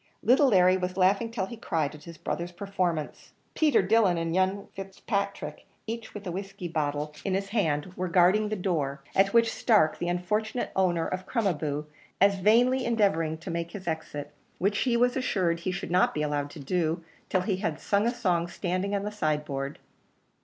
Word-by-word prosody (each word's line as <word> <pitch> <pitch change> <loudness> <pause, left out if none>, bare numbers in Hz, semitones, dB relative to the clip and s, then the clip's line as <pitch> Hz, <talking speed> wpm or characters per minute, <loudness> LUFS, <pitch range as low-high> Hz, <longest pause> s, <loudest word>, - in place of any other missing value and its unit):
Little 255 +6 +5
Larry 185 -5 +5
was 185 0 -3
laughing 195 +4 +3
till 220 -5 -2
he 235 - -8
cried 160 -10 -1
at 150 -1 -13
his 170 -1 -10
brother's 170 +2 -3
performance. 180 -5 -3 0.2
Peter 300 -10 +3
Dillon 195 -3 +3
and 165 0 -1
young 190 +2 +1
Fitzpatrick, 200 +1 -4 0.2
each 230 0 -6
with 205 0 -7
a 180 - -3
whiskey 195 0 -5
bottle 150 -2 -2
in 190 -2 0
his 195 0 -2
hand, 180 -6 0
were 185 0 -2
guarding 185 +4 +4
the 215 - -1
door, 150 -8 -2
at 195 +1 +4
which 230 0 +4
Stark, 205 -10 +3
the 175 - -2
unfortunate 210 +7 -1
owner 175 -3 +2
of 185 +1 -4
Crom 230 -4 0
a 195 - +3
boo, 150 -1 -3 0.3
was 200 +1 +5
vainly 240 +7 +4
endeavouring 195 -9 +1
to 170 +2 -7
make 170 0 -3
his 190 -3 -8
exit, 150 -3 -4 0.2
which 200 +3 +1
he 245 -2 +2
was 245 +1 +3
assured 185 -10 0
he 185 +2 -2
should 185 -1 -5
not 180 +1 +3
be 150 - 0
allowed 145 -1 -1
to 155 - -11
do 165 +3 -1 0.3
till 185 - +2
he 190 0 -1
had 165 -6 -2
sung 205 +2 +1
a - - +2
song 180 -9 0
standing 185 +3 -2
on 200 - -1
the 210 - -3
sideboard. 150 -6 -2
185 Hz, 195 wpm, -28 LUFS, 165-205 Hz, 0.3 s, Little